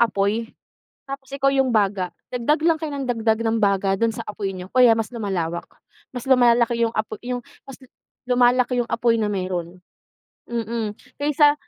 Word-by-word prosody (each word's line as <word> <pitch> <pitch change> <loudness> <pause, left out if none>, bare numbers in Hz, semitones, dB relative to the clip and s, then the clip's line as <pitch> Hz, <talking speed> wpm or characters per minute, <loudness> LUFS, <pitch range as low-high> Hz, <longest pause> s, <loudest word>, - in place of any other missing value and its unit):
apoy 220 +1 +1 0.6
tapos 275 0 -8
ikaw 275 0 +1
yung 270 -2 +2
baga. 195 -4 +1 0.2
Dagdag 250 +5 0
lang 330 0 +3
kayo 310 -2 -5
nang 275 -2 -4
dagdag 225 -2 +1
ng 225 0 +1
baga 195 -2 +2
dun 230 +2 +1
sa 230 - -7
apoy 205 -2 -3
niyo 185 0 -8
kaya 250 -2 +7
mas 225 -1 0
lumalawak. 185 -7 -3 0.5
Mas 250 +1 -6
lumalaki 235 -2 +4
yung 225 - -1
apo 215 0 -3
yung 250 0 -2 0.2
mas 270 -1 -12 0.5
lumalaki 250 0 +3
yung - - -16
apoy 230 0 +2
na 210 -2 0
meron. 185 -2 -4 0.7
Mm, 225 -2 -3 0.2
kaysa 295 0 +4
230 Hz, 165 wpm, -22 LUFS, 205-250 Hz, 0.7 s, kaya